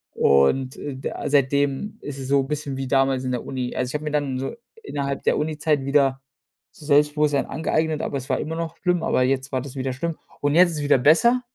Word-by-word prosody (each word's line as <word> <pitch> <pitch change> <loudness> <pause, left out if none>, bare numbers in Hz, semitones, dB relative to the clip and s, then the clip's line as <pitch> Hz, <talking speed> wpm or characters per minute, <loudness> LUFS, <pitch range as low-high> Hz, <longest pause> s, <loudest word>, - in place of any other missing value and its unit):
und, 130 - +3
äh, 145 -2 -6
da 130 - -5
seitdem 140 +6 +1
ist 140 -1 -7
es 130 - -6
so 140 -1 +3
bisschen 145 -1 -4
wie 135 -1 -3
damals 135 -1 +2
in 130 - -2
der 125 - -3
Uni. 130 -2 -4
Also, 125 -1 -1
ich - - -10
habe 150 - -2
mir 150 - -2
dann 140 -3 -1
so 135 - -4 0.3
innerhalb 140 - -3
der - - +2
Uni-Zeit 150 -1 0
wieder 140 -1 +2 0.5
so 150 - -15
Selbstbewusstsein 150 -1 +3
angeeignet, 155 +1 -1
aber 140 - -2
es 130 +1 -7
war - - +1
immer 160 +2 -4
noch 165 0 -5
schlimm, 180 -2 0
aber 130 - +2
jetzt 130 +1 -1
war 130 -2 -1
das 140 0 -9
wieder 130 -1 -2
schlimm. 165 +5 -3 0.3
Und 145 +1 +1
jetzt 180 0 +6
ist 160 - -4
es 150 - -3
wieder 145 -1 +4
besser, 235 - +4
140 Hz, 230 wpm, -23 LUFS, 135-150 Hz, 0.5 s, jetzt